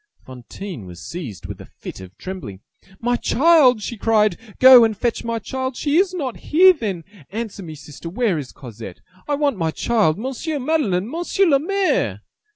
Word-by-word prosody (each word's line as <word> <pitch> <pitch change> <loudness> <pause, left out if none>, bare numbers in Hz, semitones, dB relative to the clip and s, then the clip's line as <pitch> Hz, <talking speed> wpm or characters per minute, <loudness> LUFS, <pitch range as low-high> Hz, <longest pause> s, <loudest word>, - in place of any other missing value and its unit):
Fantine 130 - -9
was 90 -1 -11
seized 145 - -7
with - - -8
a - - -12
fit - - -10
of 95 0 -13
trembling. 145 - -8 0.4
"My 245 +1 0
child!" 270 -7 +4
she 235 - -5
cried, 215 -1 +3
"to 210 +4 -15
go 255 -2 +9
and 220 -2 +1
fetch 235 +1 -1
my 230 -1 -2
child! 260 +3 -4
She 295 +1 +1
is 375 0 +3
not 280 -10 -4
here, 370 +4 +5
then! 205 - -4 0.3
Answer 215 0 -5
me, 160 -4 -8
sister; 150 +3 -10
where 200 -3 0
is 135 -3 -8
Cosette? 115 -7 -10 0.3
I 290 - +1
want 285 -5 0
my 165 -3 0
child! 205 -2 +1
Monsieur 270 +7 -4
Madeleine! 250 - 0
Monsieur 345 +7 0
le 285 -6 +4
Maire!" 390 +5 0
225 Hz, 180 wpm, -21 LUFS, 165-275 Hz, 0.4 s, go